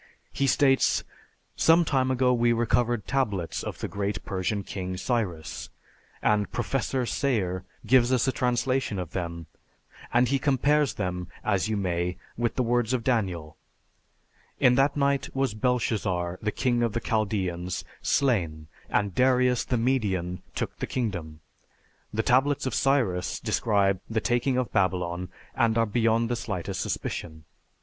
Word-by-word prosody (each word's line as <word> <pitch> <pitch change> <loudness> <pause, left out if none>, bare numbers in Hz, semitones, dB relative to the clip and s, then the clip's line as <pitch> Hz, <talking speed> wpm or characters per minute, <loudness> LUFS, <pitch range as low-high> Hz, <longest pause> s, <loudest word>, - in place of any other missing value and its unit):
He 140 - +1
states, 135 0 +3 0.5
"Some 165 +1 +5
time 130 -3 +1
ago 130 -1 +3
we 120 -1 +3
recovered 120 -1 +1
tablets 105 -11 -1
of - - -5
the - - -2
great 100 0 -3
Persian 100 +2 -2
king, 95 -1 -5
Cyrus, 95 -7 -2 0.5
and 105 -1 +2
Professor 130 +1 -1
Sayre 100 -9 -1 0.2
gives 125 -1 +4
us 130 0 +2
a - - +3
translation 125 -3 0
of 90 -3 -4
them, 85 -2 -4 0.7
and 125 +1 +4
he 135 0 +2
compares 145 +2 +2
them, 90 -3 -3 0.2
as 100 +2 +1
you 110 - 0
may, 90 -2 -1 0.2
with 120 0 -1
the 130 - +1
words 120 0 +1
of 125 -2 0
Daniel, 95 - -1 1.0
'In 125 - +5
that 135 +3 +2
night 140 -1 +1
was 135 -4 +1
Belshazzar, 105 -7 -1
the 105 - -1
king 120 +1 0
of 115 -3 +1
the 120 - 0
Chaldeans, 95 -6 -1 0.2
slain, 85 - 0 0.2
and 100 -2 0
Darius 125 +1 +3
the 125 - -1
Median 100 -8 0
took - - -3
the - - -2
kingdom.' 85 -11 -3 0.7
The 110 +1 -1
tablets 135 +4 +2
of 130 - -2
Cyrus 115 -12 +1
describe 100 -4 +1
the 110 -1 0
taking 120 +3 +1
of 125 -5 -1
Babylon, 90 -2 0 0.2
and 115 -1 +2
are 115 - +4
beyond 115 +1 +2
the 120 - -1
slightest 100 -7 -4
suspicion. 80 -2 -4
115 Hz, 145 wpm, -27 LUFS, 95-125 Hz, 1.0 s, Some